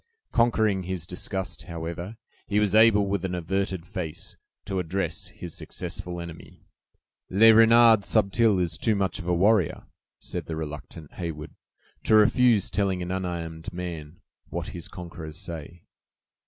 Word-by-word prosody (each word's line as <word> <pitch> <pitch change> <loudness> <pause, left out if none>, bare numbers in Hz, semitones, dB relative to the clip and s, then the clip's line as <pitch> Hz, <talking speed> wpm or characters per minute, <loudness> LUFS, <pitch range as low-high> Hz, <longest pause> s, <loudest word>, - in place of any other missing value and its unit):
Conquering 110 -4 +2
his 90 -2 -4
disgust, 90 +1 -4
however, 85 +4 -6 0.3
he 105 0 +2
was 105 -2 +1
able, 110 -2 +6
with 100 -2 -1
an 90 -1 -2
averted 95 0 -2
face, 90 +1 -5 0.3
to 95 -2 -2
address 90 -2 -2
his 85 -2 -9
successful 90 -1 -5
enemy. 85 -1 -10 0.7
"Le 110 +4 +7
Renard 115 -1 +7
Subtil 110 0 +3
is 85 -3 -1
too 110 -2 +2
much 100 0 -1
of 90 - -7
a 90 - +2
warrior," 95 -1 +2 0.4
said - - -6
the 80 - -3
reluctant 75 0 -7
Heyward, 80 -4 -5 0.5
"to 110 - +5
refuse 110 0 +4
telling 95 -3 0
an 90 - -4
unarmed 85 -3 -4
man 85 -3 -7 0.3
what - - -4
his 85 -2 -7
conquerors 85 -3 -9
say." 85 0 -8
90 Hz, 140 wpm, -26 LUFS, 85-105 Hz, 0.7 s, Le